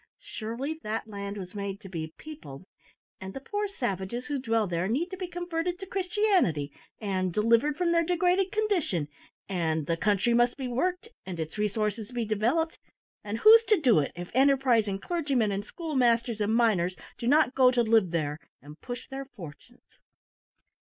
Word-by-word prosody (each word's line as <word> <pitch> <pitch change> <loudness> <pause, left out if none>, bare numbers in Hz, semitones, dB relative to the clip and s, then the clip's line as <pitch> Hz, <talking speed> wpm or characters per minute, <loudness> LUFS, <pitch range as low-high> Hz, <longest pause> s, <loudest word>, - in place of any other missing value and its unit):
Surely 255 +8 -5
that 220 +1 -3
land 200 -1 -6
was 185 -2 -7
made 200 -1 -4
to 210 - -11
be 160 -4 -5
peopled; 240 - -10 0.5
and 190 0 -8
the - - -4
poor 410 +9 -3
savages 240 - -3
who 290 -2 -2
dwell 225 -3 +1
there 175 -1 -1
need 285 - 0
to - - -4
be 365 -1 -4
converted 350 0 -3
to 385 - -7
Christianity, 370 - +1 0.3
and 185 -3 -1
delivered 230 - +2
from 345 -1 +1
their 335 0 +3
degraded 360 +3 +2
condition; 355 - 0 0.4
and 160 -5 -1
the 165 - 0
country 205 +5 +1
must 240 +1 +3
be 265 -2 -3
worked, 360 - -1
and 180 -3 -7
its 160 +6 -5
resources 210 +1 -1
be 240 -2 -2
developed; 240 +11 0 0.4
and 210 +1 -3
who's 450 +1 +9
to 425 -3 +3
do 250 - +4
it, 140 - -1
if 175 +1 -7
enterprising 255 -6 +3
clergymen, 275 - 0
and 200 +1 -2
schoolmasters, 240 -6 0
and 210 +2 +1
miners 190 -7 +2 0.2
do 235 - -3
not 290 0 +4
go 255 -1 +6
to 250 -1 +2
live 220 -4 +3
there, 155 -3 -2 0.2
and 150 +2 -14
push 245 -1 -7
their 270 0 -6
fortunes?" 180 - -14
235 Hz, 170 wpm, -28 LUFS, 195-315 Hz, 0.5 s, who's